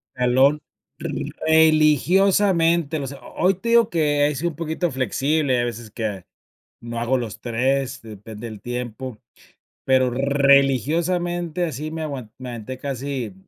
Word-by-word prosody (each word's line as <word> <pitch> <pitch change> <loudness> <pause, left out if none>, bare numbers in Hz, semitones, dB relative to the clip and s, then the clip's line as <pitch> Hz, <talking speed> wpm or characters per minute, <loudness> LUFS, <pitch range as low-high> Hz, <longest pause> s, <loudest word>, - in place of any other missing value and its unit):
Jalón, 130 +4 +3 0.4
religiosamente, 165 +1 +2
o 135 - -4
sea, 140 +1 -8
ho - - -13
hoy 190 0 +4
te 230 +6 -5
digo 235 -1 +5
que 145 -3 +2
he 150 - -2
sido 170 +5 -1
un 150 - -14
poquito 165 +1 -2
flexible, 135 +2 0
hay 120 - +1
veces 120 -1 -6
que, 105 -6 -4 0.6
no 115 0 -5
hago 125 +3 +1
los 115 -4 -6
3, 130 +3 -1
depende 110 +1 -9
del 105 -2 -10
tiempo, 125 0 -5 0.7
pero 130 -1 +3
religiosamente 145 - +2
así 155 -1 -4
me 160 0 -5
aguan 135 -8 -5
me 130 -1 -7
aventé 120 +2 -7
casi, 135 -5 -4
140 Hz, 140 wpm, -22 LUFS, 125-160 Hz, 0.7 s, digo